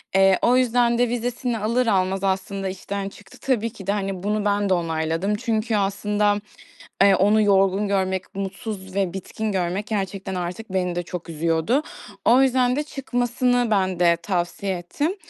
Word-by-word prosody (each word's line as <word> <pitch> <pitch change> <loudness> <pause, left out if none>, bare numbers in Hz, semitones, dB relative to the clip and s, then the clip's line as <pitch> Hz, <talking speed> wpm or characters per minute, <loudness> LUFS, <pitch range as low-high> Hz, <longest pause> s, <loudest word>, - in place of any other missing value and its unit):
Eee, 195 -1 +5
o 250 +1 +4
yüzden 240 -1 +3
de 245 -1 +2
vizesini 245 0 -2
alır 230 +3 0
almaz 190 -1 +1
aslında 195 0 -1
işten 195 +1 -4
çıktı. 195 0 -16
Tabii 230 -4 0
ki 200 -4 -12
de, - - +2
hani, 195 -2 -3
bunu 210 +1 -1
ben 205 -1 +1
de - - +4
onayladım 165 +3 -1
çünkü 220 +1 -1
aslında, 205 +1 +1 0.6
eee, 200 -1 +6
onu 210 +3 +4
yorgun 195 0 +3
görmek, 190 0 -1
mutsuz 195 -1 -5
ve 195 -3 0
bitkin 210 +3 -4
görmek 185 +2 -1
gerçekten 195 -2 -3
artık 180 +4 -5
beni 180 -2 0
de 175 - -2
çok 175 0 -7
üzüyordu. 165 - +1 0.4
O 250 +3 +6
yüzden 255 -1 +3
de 295 - 0
çıkmasını 245 -3 0
ben 190 -3 +1
de 170 -1 +5
tavsiye 185 +1 -2
ettim. 290 - -2
200 Hz, 165 wpm, -23 LUFS, 190-230 Hz, 0.6 s, eee